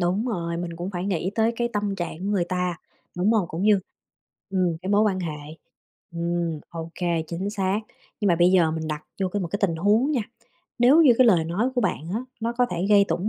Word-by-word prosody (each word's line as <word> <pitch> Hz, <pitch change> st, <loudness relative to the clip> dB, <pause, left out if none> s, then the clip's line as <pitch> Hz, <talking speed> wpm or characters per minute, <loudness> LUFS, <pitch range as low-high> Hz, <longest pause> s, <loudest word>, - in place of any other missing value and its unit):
Đúng 185 Hz, +6 st, 0 dB
rồi, 170 Hz, -7 st, -2 dB
mình 170 Hz, -1 st, -5 dB
cũng 175 Hz, +3 st, -4 dB
phải 180 Hz, -2 st, -4 dB
nghĩ 185 Hz, -1 st, -1 dB
tới 225 Hz, +1 st, +2 dB
cái 240 Hz, 0 st, 0 dB
tâm 205 Hz, -2 st, -1 dB
trạng 175 Hz, -3 st, -4 dB
của 185 Hz, -, -7 dB
người 200 Hz, -4 st, +1 dB
ta, 180 Hz, -1 st, -2 dB, 0.4 s
đúng 190 Hz, +5 st, +2 dB
hông? 205 Hz, -7 st, +1 dB
Cũng 165 Hz, +4 st, -4 dB
như, 205 Hz, -2 st, +4 dB, 0.7 s
ừm, 180 Hz, -3 st, +1 dB
cái 190 Hz, -, -3 dB
mối 205 Hz, +1 st, +4 dB
quan 190 Hz, -3 st, +1 dB
hệ. 150 Hz, -2 st, -6 dB, 0.6 s
Ừm, 170 Hz, -2 st, -2 dB
ô 165 Hz, -1 st, -6 dB
kê, 170 Hz, -2 st, 0 dB
chính 180 Hz, +5 st, -3 dB
xác. 200 Hz, 0 st, 0 dB, 0.4 s
Nhưng 205 Hz, -, +2 dB
mà 170 Hz, -, +4 dB
bây 175 Hz, +2 st, +5 dB
giờ 175 Hz, -4 st, +4 dB
mình 160 Hz, 0 st, -4 dB
đặt 150 Hz, 0 st, -4 dB, 0.2 s
vô 190 Hz, -, +1 dB
cái 205 Hz, +2 st, -2 dB
một 170 Hz, -, -3 dB
cái 200 Hz, -, -2 dB
tình 170 Hz, -4 st, +2 dB
huống 210 Hz, -, +3 dB
nha, 265 Hz, -6 st, +1 dB, 0.6 s
nếu 270 Hz, +7 st, +6 dB
như 260 Hz, -5 st, +7 dB
cái 255 Hz, -, +6 dB
lời 175 Hz, -8 st, +4 dB
nói 205 Hz, +10 st, 0 dB
của 245 Hz, -, +1 dB
bạn 160 Hz, -, -2 dB
á 225 Hz, -, 0 dB, 0.2 s
nó 230 Hz, +1 st, -1 dB
có 245 Hz, +1 st, +2 dB
thể 180 Hz, +1 st, -1 dB
gây 200 Hz, -1 st, +7 dB
tổn 175 Hz, +5 st, -1 dB
185 Hz, 240 wpm, -24 LUFS, 170-210 Hz, 0.7 s, như